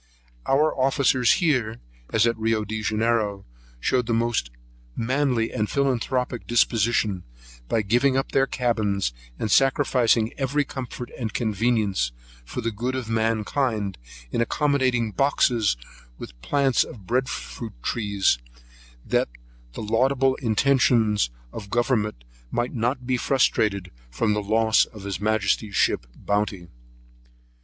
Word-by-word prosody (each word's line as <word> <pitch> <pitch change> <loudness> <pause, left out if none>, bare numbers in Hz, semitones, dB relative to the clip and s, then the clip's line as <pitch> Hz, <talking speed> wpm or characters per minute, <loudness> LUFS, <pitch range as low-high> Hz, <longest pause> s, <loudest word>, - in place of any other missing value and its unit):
Our 150 +3 +3
officers 130 -2 +3
here, 125 - +1 0.3
as 110 0 +3
at 115 0 +2
Rio 110 -1 0
Janeiro, 110 -1 -1 0.3
showed 125 - +1
the 115 - +1
most 115 - 0 0.5
manly 125 -1 0
and 105 0 -1
philanthropic 130 -2 -1
disposition, 110 -5 +2 0.5
by 110 - +1
giving 125 +6 +2
up 135 - -1
their 135 0 +3
cabins, 105 - 0 0.2
and 110 - -2
sacrificing 125 -4 +3
every 140 +2 +1
comfort 125 -2 -7
and 115 -3 -4
convenience 110 - 0 0.3
for 125 - -5
the 115 0 -1
good 120 +5 -3
of 125 -4 -4
mankind, 110 -2 0 0.3
in - - 0
accommodating 130 -4 +1
boxes 120 - +2 0.4
with - - -11
plants 135 - +2
of - - -10
the 105 - -15
Bread 125 +7 0
fruit 115 -2 -6
tree, 100 -3 -2 0.9
that - - +1 0.4
the - - -6
laudable 130 +4 +2
intentions 115 - +2 0.2
of 105 -3 -8
government 110 - 0 0.3
might 120 - -2
not 125 +2 -1
be 130 0 +1
frustrated 105 -8 +1 0.2
from 105 - 0
the 105 - -1
loss 110 +2 +3
of 105 -4 -13
his 100 -2 -4
majesty's 105 -1 0
ship - - +1
Bounty. 100 -4 -2
115 Hz, 125 wpm, -24 LUFS, 105-130 Hz, 0.9 s, Our